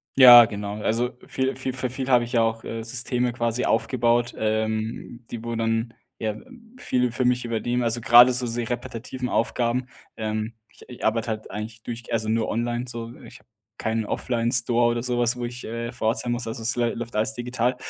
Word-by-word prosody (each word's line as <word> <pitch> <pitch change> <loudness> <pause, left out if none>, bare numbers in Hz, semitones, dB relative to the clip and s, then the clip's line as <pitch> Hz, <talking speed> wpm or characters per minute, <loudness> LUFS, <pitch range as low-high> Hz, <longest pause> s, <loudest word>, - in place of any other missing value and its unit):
Ja, 120 -3 +11
genau, 105 0 -5
also 120 +4 0 0.2
viel 130 0 -1
viel 130 0 -4
für 130 0 -3
viel 130 0 -4
habe 125 -2 +5
ich 120 - -7
ja 115 - +4
auch, 115 0 0
äh, 115 - -5
Systeme 125 +1 0
quasi 120 0 -1
aufgebaut, 120 +1 +1
ähm, 110 +2 -2
die, 115 -1 -6
wo 115 0 -3
dann 115 +1 -1 0.2
ja 110 -1 -2 0.4
viel 125 - 0
für 125 +2 -1
mich 125 0 +1
übernehmen, 120 +2 -1
also 120 +1 0
grade 120 +2 +8
so 125 0 -1
sehr 115 0 -3
repetitive 125 +1 -4
Aufgaben. 120 +2 0 0.3
Ähm, 110 0 -3 0.3
i - - -13
ich - - -7
arbeite 110 +1 +1
halt 110 -1 -5
eigentlich 110 +2 -7
durch 120 -1 -7
also 110 -1 -1
nur 110 0 +1
online 120 +2 -1
so. 115 -1 -6
Ich - - -13
habe - - -30 0.3
keinen 110 0 -1
Offline-Store 120 0 +1
oder 120 0 -1
so 125 -1 -1
was, 120 +1 +2
wo 120 - -3
ich, 120 +1 -7
äh, 115 +1 -4
vor 120 -2 -3
Ort 115 +4 +2
sein 120 - -1
muss, 120 -1 -2
also 115 0 -5
es 115 0 +1
läuft 120 -1 -2
alles 110 +5 0
digital. 125 0 -1
120 Hz, 200 wpm, -24 LUFS, 115-125 Hz, 0.4 s, Ja